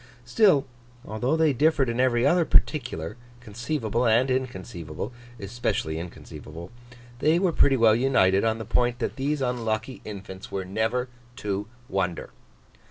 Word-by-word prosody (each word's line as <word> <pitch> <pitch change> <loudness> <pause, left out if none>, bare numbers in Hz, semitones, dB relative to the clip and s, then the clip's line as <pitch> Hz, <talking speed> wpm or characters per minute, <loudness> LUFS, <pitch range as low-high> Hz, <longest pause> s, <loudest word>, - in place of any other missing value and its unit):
Still, 150 - +4 0.4
although 125 +9 -1
they 160 -3 +3
differed 145 0 +3
in 115 +1 -2
every 125 -2 +3
other 175 0 +4
particular, 120 - 0 0.2
conceivable 120 +1 -2
and 120 +4 +3
inconceivable 95 -8 -4 0.3
(especially 100 -6 -2
inconceivable), 85 0 -9 0.5
they 155 +5 +3
were 180 -1 +2
pretty 135 -3 +4
well 115 -2 +5
united 100 -7 +3
on 110 0 +1
the 110 - -6
point 120 +2 +1
that 125 - -3
these 140 +1 -1
unlucky 120 0 -2
infants 95 -2 -9
were 95 -1 -3
never 110 +6 -1 0.3
to 105 -4 -3 0.2
wonder. 90 -6 -2
120 Hz, 135 wpm, -26 LUFS, 100-130 Hz, 0.5 s, well